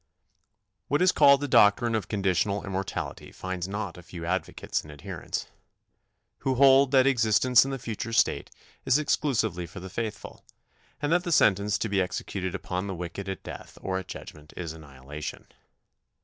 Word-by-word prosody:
What 145 Hz, -, +1 dB
is 185 Hz, -, +5 dB
called 140 Hz, 0 st, +6 dB
the 145 Hz, -, -1 dB
doctrine 115 Hz, 0 st, +5 dB
of 110 Hz, -2 st, -1 dB
Conditional 100 Hz, 0 st, 0 dB
Immortality 95 Hz, -1 st, -4 dB
finds 95 Hz, -1 st, -4 dB
not 100 Hz, -3 st, -4 dB
a -, -, -10 dB
few 85 Hz, -1 st, -8 dB
advocates 95 Hz, +2 st, -2 dB
and 75 Hz, -, -12 dB
adherents, 75 Hz, -1 st, -5 dB, 0.9 s
who 135 Hz, -1 st, 0 dB
hold 135 Hz, +1 st, +6 dB
that 130 Hz, -1 st, +5 dB
existence 125 Hz, -1 st, +4 dB
in -, -, -3 dB
the 135 Hz, -, -3 dB
future 115 Hz, -2 st, -5 dB
state 115 Hz, -, +2 dB, 0.3 s
is 130 Hz, +1 st, +4 dB
exclusively 115 Hz, -, 0 dB
for 90 Hz, -, -9 dB
the 95 Hz, 0 st, -9 dB
faithful, 110 Hz, -2 st, -5 dB, 0.6 s
and 145 Hz, -, +1 dB
that 175 Hz, +1 st, +3 dB
the 175 Hz, -, -3 dB
sentence 105 Hz, -, +3 dB
to -, -, -2 dB
be 100 Hz, -2 st, +1 dB
executed 95 Hz, 0 st, -3 dB
upon 90 Hz, 0 st, -3 dB
the 95 Hz, -, -4 dB
wicked 90 Hz, +3 st, -6 dB
at 95 Hz, -, -5 dB
death -, -, -9 dB
or 95 Hz, -1 st, -2 dB
at 95 Hz, -, -9 dB
judgment 75 Hz, -4 st, -10 dB
is 85 Hz, -3 st, -4 dB
annihilation. 75 Hz, -1 st, -8 dB
100 Hz, 165 wpm, -27 LUFS, 90-125 Hz, 0.9 s, called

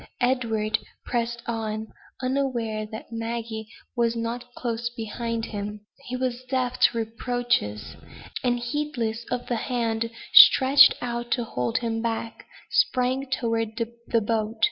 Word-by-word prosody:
Edward 225 Hz, -4 st, +1 dB, 0.3 s
pressed 235 Hz, -1 st, -2 dB
on, 220 Hz, -1 st, -3 dB, 0.3 s
unaware 240 Hz, -5 st, -1 dB
that 220 Hz, +1 st, -8 dB
Maggie 225 Hz, -1 st, -4 dB, 0.3 s
was 235 Hz, -1 st, +2 dB
not 235 Hz, +2 st, -4 dB
close 235 Hz, -1 st, -2 dB
behind 230 Hz, 0 st, -3 dB
him. 210 Hz, -1 st, -5 dB, 0.2 s
He 250 Hz, -, -4 dB
was 250 Hz, -1 st, -2 dB
deaf 255 Hz, -1 st, -1 dB
to 235 Hz, -, +4 dB
reproaches; 230 Hz, -, -1 dB, 0.5 s
and, 245 Hz, -1 st, +2 dB
heedless 240 Hz, -4 st, -2 dB
of 250 Hz, 0 st, -2 dB
the 240 Hz, -, -1 dB
hand 230 Hz, -2 st, -1 dB, 0.2 s
stretched 275 Hz, +1 st, +9 dB
out 240 Hz, 0 st, -3 dB
to 245 Hz, -, 0 dB
hold 125 Hz, -, -1 dB
him 225 Hz, -1 st, -1 dB
back, 230 Hz, 0 st, -4 dB, 0.2 s
sprang 255 Hz, +1 st, +2 dB
toward 225 Hz, -4 st, -1 dB
the 235 Hz, 0 st, -1 dB
boat. 220 Hz, 0 st, -1 dB
235 Hz, 125 wpm, -25 LUFS, 225-245 Hz, 0.5 s, stretched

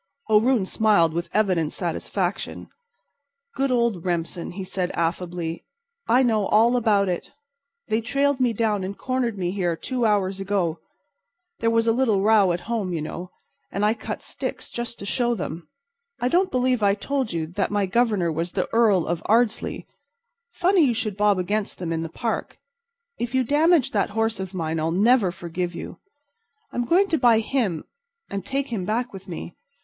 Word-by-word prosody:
O'Roon 220 Hz, 0 st, +4 dB
smiled 190 Hz, -6 st, +3 dB
with 170 Hz, +1 st, -3 dB
evident 185 Hz, -7 st, +1 dB
satisfaction. 180 Hz, +2 st, -3 dB, 0.8 s
"Good 270 Hz, +2 st, 0 dB
old 235 Hz, -8 st, +1 dB
Remsen," 170 Hz, -1 st, -3 dB
he 190 Hz, +1 st, -5 dB
said, 185 Hz, -1 st, -2 dB
affably, 170 Hz, 0 st, -2 dB, 0.4 s
"I 245 Hz, +3 st, +4 dB
know 215 Hz, -5 st, +2 dB
all 230 Hz, +3 st, +4 dB
about 210 Hz, -5 st, +3 dB
it. 180 Hz, -2 st, -3 dB, 0.6 s
They 220 Hz, 0 st, +1 dB
trailed 275 Hz, +4 st, +1 dB
me 250 Hz, -2 st, +3 dB
down 215 Hz, -3 st, 0 dB
and 195 Hz, +2 st, -5 dB
cornered 255 Hz, -4 st, -1 dB
me 180 Hz, -2 st, -1 dB
here 180 Hz, -3 st, 0 dB
two 250 Hz, +8 st, -3 dB
hours 195 Hz, -2 st, +1 dB
ago. 190 Hz, -4 st, -1 dB, 0.8 s
There 230 Hz, -, +2 dB
was 230 Hz, 0 st, +2 dB
a 230 Hz, -, +4 dB
little 225 Hz, -5 st, +2 dB
row 210 Hz, -3 st, +5 dB
at 175 Hz, 0 st, -2 dB
home, 210 Hz, -2 st, -2 dB
you 165 Hz, -, -2 dB
know, 175 Hz, +3 st, -6 dB, 0.4 s
and 200 Hz, +1 st, 0 dB
I 215 Hz, -, +3 dB
cut 225 Hz, -, -6 dB
sticks -, -, -5 dB
just 240 Hz, 0 st, -4 dB
to -, -, -7 dB
show 240 Hz, +3 st, +1 dB
them. 165 Hz, -4 st, -6 dB, 0.5 s
I 245 Hz, +1 st, +1 dB
don't 370 Hz, +6 st, +3 dB
believe 255 Hz, -2 st, +1 dB
I 200 Hz, -1 st, +4 dB
told 265 Hz, +3 st, -2 dB
you 165 Hz, -2 st, -2 dB
that 185 Hz, +5 st, -2 dB
my 205 Hz, -1 st, +1 dB
Governor 200 Hz, -4 st, +1 dB
was 165 Hz, +2 st, -3 dB
the -, -, 0 dB
Earl 215 Hz, -7 st, +4 dB
of 170 Hz, -1 st, -2 dB
Ardsley. 225 Hz, 0 st, +1 dB, 0.6 s
Funny 370 Hz, -2 st, +2 dB
you 245 Hz, -5 st, +2 dB
should 215 Hz, -4 st, -2 dB
bob 205 Hz, -1 st, +3 dB
against 200 Hz, +3 st, -1 dB
them 170 Hz, -2 st, -3 dB
in 165 Hz, -, -1 dB
the 165 Hz, -, -4 dB
Park. 225 Hz, +7 st, -3 dB, 0.6 s
If 240 Hz, +2 st, -2 dB
you 260 Hz, -, +3 dB
damaged 290 Hz, +1 st, +3 dB
that -, -, +1 dB
horse 225 Hz, +1 st, -1 dB
of 190 Hz, 0 st, -5 dB
mine 165 Hz, -2 st, -2 dB
I'll 160 Hz, +1 st, 0 dB
never 205 Hz, +2 st, +3 dB
forgive 175 Hz, 0 st, -4 dB
you. -, -, -7 dB, 0.7 s
I'm 245 Hz, -, -1 dB
going 370 Hz, +8 st, +4 dB
to 320 Hz, -, +1 dB
buy 240 Hz, -3 st, +5 dB
him 220 Hz, -, -1 dB, 0.5 s
and 200 Hz, -1 st, -3 dB
take 275 Hz, +6 st, -2 dB
him 220 Hz, -6 st, -2 dB
back 235 Hz, +5 st, -1 dB
with 195 Hz, -1 st, -10 dB
me. 170 Hz, -1 st, -7 dB
210 Hz, 180 wpm, -24 LUFS, 180-240 Hz, 0.8 s, row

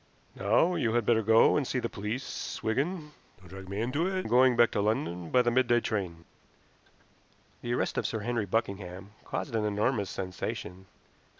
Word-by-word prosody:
Now 110 Hz, -, +2 dB
you 120 Hz, -10 st, 0 dB
had 120 Hz, -2 st, +2 dB
better 115 Hz, -1 st, +3 dB
go 110 Hz, +1 st, +5 dB
and 140 Hz, -4 st, 0 dB
see -, -, -2 dB
the 120 Hz, -, -1 dB
police, 110 Hz, +5 st, -5 dB
Wigan. 150 Hz, +7 st, -1 dB, 0.3 s
Don't 90 Hz, -2 st, -17 dB
drag 95 Hz, 0 st, -10 dB
me 100 Hz, +2 st, -3 dB
into 145 Hz, +9 st, 0 dB
it. 190 Hz, -, -2 dB
I -, -, 0 dB
am -, -, -6 dB
going 125 Hz, +1 st, +5 dB
back 120 Hz, -1 st, +5 dB
to 100 Hz, -, 0 dB
London 90 Hz, -5 st, -1 dB
by 125 Hz, -1 st, +4 dB
the 120 Hz, -, +2 dB
midday 120 Hz, -1 st, +3 dB
train." 90 Hz, -8 st, -3 dB, 1.4 s
The 120 Hz, 0 st, -1 dB
arrest -, -, -1 dB
of -, -, -1 dB
Sir 110 Hz, -, -3 dB
Henry 115 Hz, -2 st, -1 dB
Buckingham 95 Hz, -2 st, -3 dB
caused 140 Hz, -, -4 dB
an 110 Hz, -, +1 dB
enormous 105 Hz, 0 st, 0 dB
sensation. 95 Hz, 0 st, -5 dB
110 Hz, 185 wpm, -29 LUFS, 100-125 Hz, 1.4 s, go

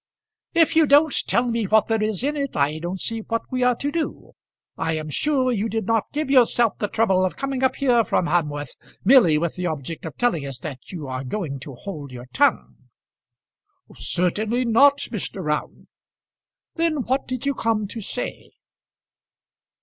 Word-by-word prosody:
"If 330 Hz, -1 st, +4 dB
you 320 Hz, -2 st, +5 dB
don't 290 Hz, +2 st, +5 dB
tell 240 Hz, -, +2 dB
me 230 Hz, -2 st, 0 dB
what 215 Hz, +2 st, +4 dB
there 225 Hz, -1 st, 0 dB
is 215 Hz, +1 st, -1 dB
in 290 Hz, +2 st, 0 dB
it, 280 Hz, -2 st, -3 dB
I 150 Hz, +3 st, +1 dB
don't 175 Hz, +3 st, -4 dB
see 225 Hz, +3 st, -2 dB
what 230 Hz, +1 st, -3 dB
we 255 Hz, -1 st, -1 dB
are 250 Hz, 0 st, +3 dB
to 285 Hz, +4 st, -3 dB
do. 330 Hz, 0 st, -4 dB, 0.4 s
I 160 Hz, -, -1 dB
am 155 Hz, -1 st, -5 dB
sure 265 Hz, -, +1 dB
you 225 Hz, -1 st, -1 dB
did 225 Hz, 0 st, -2 dB
not 225 Hz, -1 st, 0 dB
give 295 Hz, -2 st, -2 dB
yourself 240 Hz, -4 st, +3 dB
the 210 Hz, -, 0 dB
trouble 195 Hz, -4 st, +2 dB
of 185 Hz, -, -1 dB
coming 270 Hz, -1 st, -2 dB
up 260 Hz, 0 st, +2 dB
here 245 Hz, -4 st, +3 dB
from 185 Hz, -, 0 dB
Hamworth 150 Hz, -4 st, -1 dB, 0.3 s
merely 210 Hz, -, +6 dB
with 170 Hz, +2 st, -2 dB
the 180 Hz, 0 st, -1 dB
object 160 Hz, 0 st, -5 dB
of 155 Hz, -, -9 dB
telling 240 Hz, -12 st, +1 dB
us 135 Hz, -2 st, -5 dB
that 135 Hz, -5 st, -8 dB
you 160 Hz, -7 st, -6 dB
are 130 Hz, 0 st, -4 dB
going 140 Hz, -1 st, -4 dB
to 135 Hz, 0 st, -9 dB
hold 150 Hz, -2 st, -8 dB
your 125 Hz, -1 st, -9 dB
tongue." 285 Hz, +1 st, 0 dB, 1.1 s
"Certainly 215 Hz, +7 st, 0 dB
not, 275 Hz, +5 st, +5 dB
Mr. 200 Hz, -3 st, -4 dB
Round." 150 Hz, 0 st, -3 dB, 0.9 s
"Then 325 Hz, -5 st, 0 dB
what 265 Hz, +3 st, -1 dB
did 255 Hz, 0 st, -4 dB
you 280 Hz, -, +1 dB
come 225 Hz, -4 st, 0 dB
to 225 Hz, -, -6 dB
say?" -, -, -6 dB
220 Hz, 180 wpm, -23 LUFS, 165-260 Hz, 1.1 s, merely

